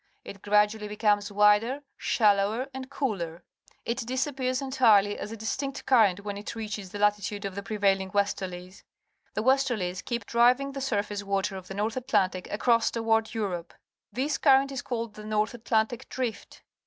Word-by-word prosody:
It 200 Hz, -, -9 dB
gradually 210 Hz, +1 st, +2 dB
becomes 205 Hz, -1 st, +1 dB
wider, 210 Hz, +7 st, +3 dB
shallower, 210 Hz, +3 st, +2 dB
and 260 Hz, 0 st, -7 dB
cooler. 185 Hz, -, -3 dB, 0.4 s
It 235 Hz, +2 st, -2 dB
disappears 255 Hz, +1 st, -1 dB
entirely 230 Hz, -7 st, +4 dB
as 210 Hz, -, -6 dB
a 225 Hz, -, -6 dB
distinct 270 Hz, +6 st, -4 dB
current 210 Hz, -7 st, +4 dB
when 205 Hz, -1 st, -4 dB
it 210 Hz, +3 st, -6 dB
reaches 210 Hz, -3 st, -5 dB
the 205 Hz, -, -7 dB
la 210 Hz, 0 st, +5 dB
titude 205 Hz, 0 st, -6 dB
of 195 Hz, -, -4 dB
the 200 Hz, -, -5 dB
pxeiraUiogjvvesterlies. 195 Hz, -2 st, -1 dB, 0.5 s
The 215 Hz, -, -1 dB
westerlies 240 Hz, -9 st, +1 dB
keep 235 Hz, -3 st, -3 dB
driving 250 Hz, +5 st, +3 dB
the 275 Hz, 0 st, -6 dB
surface 205 Hz, -5 st, -2 dB
water 195 Hz, 0 st, -1 dB
of 185 Hz, -1 st, -8 dB
the 195 Hz, -, -7 dB
North 215 Hz, +4 st, -1 dB
Atlantic 195 Hz, -7 st, 0 dB
across 230 Hz, +2 st, +2 dB
towarcl 225 Hz, -1 st, 0 dB
Europe. 180 Hz, -6 st, -3 dB, 0.4 s
This 280 Hz, +4 st, -1 dB
current 275 Hz, -1 st, +4 dB
is 270 Hz, -, -4 dB
called 230 Hz, -3 st, -4 dB
the 215 Hz, -, -10 dB
North 215 Hz, 0 st, 0 dB
Atlantic 230 Hz, +1 st, -1 dB
Drift. 245 Hz, -3 st, -5 dB
215 Hz, 160 wpm, -27 LUFS, 200-245 Hz, 0.5 s, la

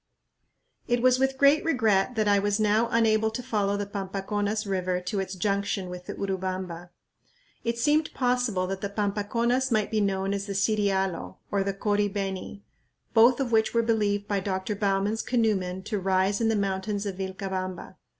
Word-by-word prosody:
It 240 Hz, 0 st, +1 dB
was 255 Hz, 0 st, +5 dB
with 265 Hz, 0 st, +1 dB
great 280 Hz, +3 st, +5 dB
regret 225 Hz, -7 st, +2 dB
that 215 Hz, -2 st, +1 dB
I 200 Hz, -1 st, +4 dB
was 205 Hz, +1 st, 0 dB
now 215 Hz, +2 st, +2 dB
unable 220 Hz, -1 st, +3 dB
to 225 Hz, +3 st, -5 dB
follow 205 Hz, -4 st, 0 dB
the 205 Hz, -, -2 dB
Pampaconas 205 Hz, +2 st, -2 dB
River 185 Hz, -2 st, -1 dB
to 180 Hz, +3 st, -3 dB
its 190 Hz, 0 st, -3 dB
junction 200 Hz, 0 st, -1 dB
with 180 Hz, 0 st, -8 dB
the -, -, -5 dB
Urubamba. 185 Hz, -3 st, -4 dB, 0.7 s
It 235 Hz, 0 st, -1 dB
seemed 300 Hz, +5 st, +2 dB
possible 245 Hz, -7 st, +1 dB
that 190 Hz, 0 st, -4 dB
the 200 Hz, -, -2 dB
Pampaconas 230 Hz, +5 st, 0 dB
might 215 Hz, -2 st, +1 dB
be 215 Hz, -1 st, +1 dB
known 195 Hz, -1 st, 0 dB
as 200 Hz, 0 st, -3 dB
the 200 Hz, -, -3 dB
Sirialo, 195 Hz, -3 st, 0 dB
or 200 Hz, -1 st, +1 dB
the 195 Hz, 0 st, -2 dB
Cori 205 Hz, 0 st, +1 dB
beni, 195 Hz, 0 st, -4 dB, 0.5 s
both 240 Hz, +3 st, +6 dB
of 260 Hz, -3 st, -1 dB
which 220 Hz, 0 st, +2 dB
were 230 Hz, -, +4 dB
believed 205 Hz, -3 st, 0 dB
by 200 Hz, -1 st, 0 dB
Dr. 190 Hz, +1 st, -2 dB
Bowman's 200 Hz, +2 st, 0 dB
canoe 225 Hz, -4 st, +2 dB
men 185 Hz, 0 st, -4 dB
to 210 Hz, 0 st, -2 dB
rise 190 Hz, +2 st, +1 dB
in 225 Hz, -, +2 dB
the 225 Hz, -, +2 dB
mountains 200 Hz, +1 st, -1 dB
of 195 Hz, -2 st, -4 dB
Vilcabamba. 190 Hz, -1 st, -4 dB
205 Hz, 180 wpm, -27 LUFS, 195-225 Hz, 0.7 s, both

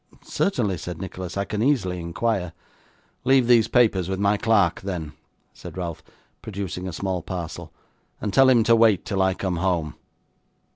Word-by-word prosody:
'Certainly,' 105 Hz, -, -1 dB
said 90 Hz, +1 st, -6 dB
Nicholas. 95 Hz, -1 st, -6 dB
'I 100 Hz, -, 0 dB
can 105 Hz, +1 st, -3 dB
easily 110 Hz, -9 st, +1 dB
inquire.' 90 Hz, +1 st, -2 dB, 0.7 s
'Leave 130 Hz, 0 st, +4 dB
these 115 Hz, -2 st, +5 dB
papers 110 Hz, -7 st, +2 dB
with 95 Hz, 0 st, -2 dB
my 100 Hz, +1 st, +3 dB
clerk, 100 Hz, -5 st, +2 dB
then,' 85 Hz, -6 st, -5 dB, 0.4 s
said -, -, -10 dB
Ralph, 85 Hz, -3 st, -4 dB, 0.4 s
producing 95 Hz, -3 st, -5 dB
a -, -, -4 dB
small 95 Hz, +1 st, -3 dB
parcel, 85 Hz, -2 st, -6 dB, 0.5 s
'and 105 Hz, -, -3 dB
tell 135 Hz, +5 st, +6 dB
him 120 Hz, -3 st, +5 dB
to 115 Hz, +1 st, +5 dB
wait 110 Hz, -5 st, +4 dB
till 95 Hz, -2 st, -1 dB
I 95 Hz, 0 st, +2 dB
come 95 Hz, -3 st, -2 dB
home. 85 Hz, -4 st, -1 dB
95 Hz, 160 wpm, -24 LUFS, 90-110 Hz, 0.7 s, tell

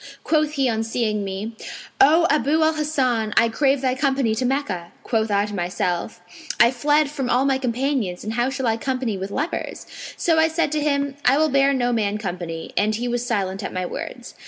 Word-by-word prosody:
Quoth 305 Hz, -1 st, +1 dB
he 275 Hz, -3 st, +1 dB
on 225 Hz, -2 st, 0 dB
seeing 220 Hz, -2 st, -1 dB
me, 200 Hz, +4 st, -5 dB, 0.4 s
'O 320 Hz, +5 st, +6 dB
Abu 300 Hz, +2 st, +2 dB
al 315 Hz, 0 st, +3 dB
Hasan, 260 Hz, -8 st, 0 dB
I 230 Hz, -, +5 dB
crave 275 Hz, +3 st, +1 dB
thy 260 Hz, -1 st, +1 dB
company 265 Hz, -3 st, +1 dB
to 230 Hz, +4 st, -1 dB
Meccah.' 215 Hz, -11 st, -2 dB, 0.2 s
Quoth 220 Hz, -2 st, 0 dB
I 200 Hz, 0 st, +2 dB
to 210 Hz, -, -7 dB
myself, 180 Hz, -1 st, -2 dB, 0.4 s
'I 235 Hz, 0 st, +6 dB
fled 290 Hz, +3 st, +2 dB
from 270 Hz, -4 st, -3 dB
all 255 Hz, +2 st, +2 dB
my 270 Hz, -1 st, +2 dB
companions, 250 Hz, -6 st, -1 dB
and 215 Hz, -, -4 dB
how 240 Hz, +2 st, +1 dB
shall 265 Hz, -1 st, -3 dB
I 225 Hz, -1 st, +1 dB
company 255 Hz, -3 st, -2 dB
with 190 Hz, +1 st, -5 dB
lepers?' 295 Hz, -, -4 dB, 0.3 s
So 325 Hz, -2 st, +2 dB
I 320 Hz, -, +5 dB
said 320 Hz, -2 st, 0 dB
to 305 Hz, -1 st, 0 dB
him, 280 Hz, -1 st, 0 dB
'I 270 Hz, +3 st, +5 dB
will 310 Hz, +1 st, +3 dB
bear 275 Hz, 0 st, +3 dB
no 245 Hz, -3 st, +1 dB
man 210 Hz, -2 st, 0 dB
company'; 175 Hz, -5 st, -5 dB
and 215 Hz, +1 st, +1 dB
he 240 Hz, +3 st, -3 dB
was 240 Hz, 0 st, -1 dB
silent 195 Hz, -5 st, -2 dB
at -, -, -5 dB
my 185 Hz, 0 st, -2 dB
words. -, -, -7 dB
245 Hz, 205 wpm, -22 LUFS, 215-280 Hz, 0.4 s, O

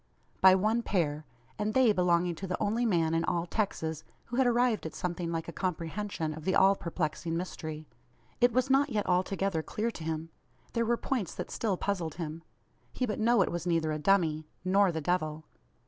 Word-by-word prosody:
By 190 Hz, 0 st, +8 dB
one 215 Hz, +5 st, +2 dB
pair; 155 Hz, -8 st, -1 dB, 0.3 s
and 215 Hz, +1 st, -1 dB
they 255 Hz, -4 st, +6 dB
belonging 175 Hz, -1 st, +2 dB
to 190 Hz, +4 st, -6 dB
the 180 Hz, -, -2 dB
only 225 Hz, +3 st, +1 dB
man 165 Hz, -5 st, +2 dB
in 165 Hz, 0 st, +1 dB
all 170 Hz, 0 st, 0 dB
Texas 160 Hz, -5 st, -2 dB, 0.2 s
who 240 Hz, -, -5 dB
had 265 Hz, -1 st, +4 dB
arrived 240 Hz, -6 st, +2 dB
at 160 Hz, -, -10 dB
something 175 Hz, -1 st, -3 dB
like 165 Hz, -1 st, -3 dB
a -, -, -4 dB
comprehension 175 Hz, -1 st, -3 dB
of 155 Hz, 0 st, -9 dB
the 190 Hz, +3 st, +1 dB
all 195 Hz, +1 st, +6 dB
perplexing 165 Hz, -1 st, -3 dB
mystery. 155 Hz, -3 st, -5 dB, 0.5 s
It 245 Hz, 0 st, +5 dB
was 255 Hz, +2 st, +2 dB
not 280 Hz, +2 st, +4 dB
yet 215 Hz, -4 st, -1 dB
altogether 185 Hz, -1 st, +1 dB
clear 220 Hz, +8 st, -2 dB
to 170 Hz, -, -9 dB
him. 160 Hz, 0 st, -3 dB, 0.4 s
There 230 Hz, -1 st, 0 dB
were 235 Hz, 0 st, +2 dB
points 235 Hz, -11 st, -2 dB
that -, -, -5 dB
still 205 Hz, -5 st, -1 dB
puzzled 175 Hz, -6 st, -2 dB
him. 165 Hz, -1 st, -5 dB, 0.5 s
He 255 Hz, -, -1 dB
but 215 Hz, -, -3 dB
know 235 Hz, +2 st, +4 dB
it -, -, -3 dB
was 175 Hz, +1 st, -3 dB
neither 165 Hz, -2 st, +1 dB
a 155 Hz, -, -2 dB
dummy, 155 Hz, -4 st, +2 dB, 0.2 s
nor 195 Hz, 0 st, +4 dB
the 160 Hz, -1 st, -3 dB
Devil. 155 Hz, -2 st, -1 dB
180 Hz, 195 wpm, -30 LUFS, 160-215 Hz, 0.5 s, By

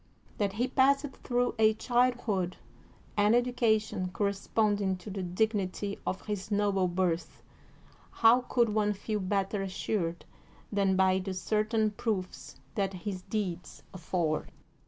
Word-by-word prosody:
That 200 Hz, -2 st, +1 dB
he 240 Hz, +5 st, 0 dB
passed 275 Hz, +2 st, +3 dB, 0.2 s
through 245 Hz, 0 st, +1 dB
a 220 Hz, 0 st, +5 dB
childhood 240 Hz, -7 st, +1 dB, 0.6 s
and 210 Hz, +2 st, +4 dB
education 225 Hz, -6 st, +1 dB
cor 200 Hz, +3 st, -1 dB
responding 200 Hz, -1 st, 0 dB
to 190 Hz, +3 st, -9 dB
the 195 Hz, 0 st, -4 dB
dignity 200 Hz, +1 st, -1 dB
of 190 Hz, -, -3 dB
his 205 Hz, -1 st, -4 dB
noble 200 Hz, -3 st, +2 dB
birth 175 Hz, -1 st, -1 dB, 0.7 s
how 230 Hz, +2 st, +5 dB
could 235 Hz, -2 st, +3 dB
one 210 Hz, -1 st, +1 dB
feel 210 Hz, +2 st, -3 dB
better 195 Hz, +1 st, -1 dB
assured 185 Hz, -2 st, -2 dB, 0.5 s
than 200 Hz, -2 st, +2 dB
by 190 Hz, 0 st, +3 dB
the 190 Hz, 0 st, -4 dB
certain 215 Hz, +3 st, +1 dB
proofs 200 Hz, -3 st, -4 dB, 0.2 s
that 195 Hz, -2 st, -1 dB
his 185 Hz, 0 st, -5 dB
deeds 185 Hz, -4 st, -4 dB
afford? 170 Hz, -3 st, -2 dB
205 Hz, 130 wpm, -30 LUFS, 185-220 Hz, 0.7 s, a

